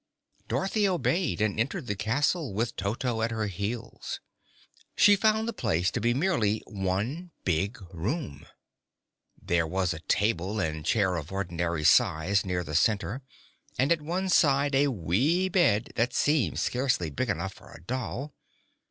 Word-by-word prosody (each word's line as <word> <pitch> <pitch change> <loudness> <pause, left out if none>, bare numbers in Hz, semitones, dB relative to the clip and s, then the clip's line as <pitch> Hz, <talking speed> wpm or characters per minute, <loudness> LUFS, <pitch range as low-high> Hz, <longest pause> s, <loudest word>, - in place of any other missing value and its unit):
Dorothy 200 +2 +1
obeyed 175 - 0
and 110 -1 0
entered 140 +7 -1
the 105 - -2
castle, 140 - 0
with 115 +2 -1
Toto 115 +4 -2
at 115 - +1
her 110 -1 -2
heels. 105 +5 -5 0.8
She 205 0 +7
found 220 +2 +2
the 230 - -2
place 95 - 0
to - - -2
be 120 +2 +2
merely 125 - +1
one 105 - -3 0.2
big 95 +6 0 0.2
room. 95 - -4 0.9
There 85 -1 0
was 90 0 0
a 80 - -7
table 100 +2 0
and 80 -4 -2
chair 95 0 +1
of 80 +1 -6
ordinary 85 -4 -2
size 85 +6 +4
near 90 -2 -2
the 75 - -7
center, 105 - +1 0.6
and 135 +4 +2
at 165 -2 +3
one 175 +5 -2
side 140 -4 +3
a 140 +2 +4
wee 135 - +1
bed 120 - +2
that 120 +2 0
seemed 145 -3 +2
scarcely 125 - 0
big 70 - -2
enough - - -2
for - - -16
a 80 - -13
doll. 130 - -4
110 Hz, 150 wpm, -28 LUFS, 95-145 Hz, 0.9 s, She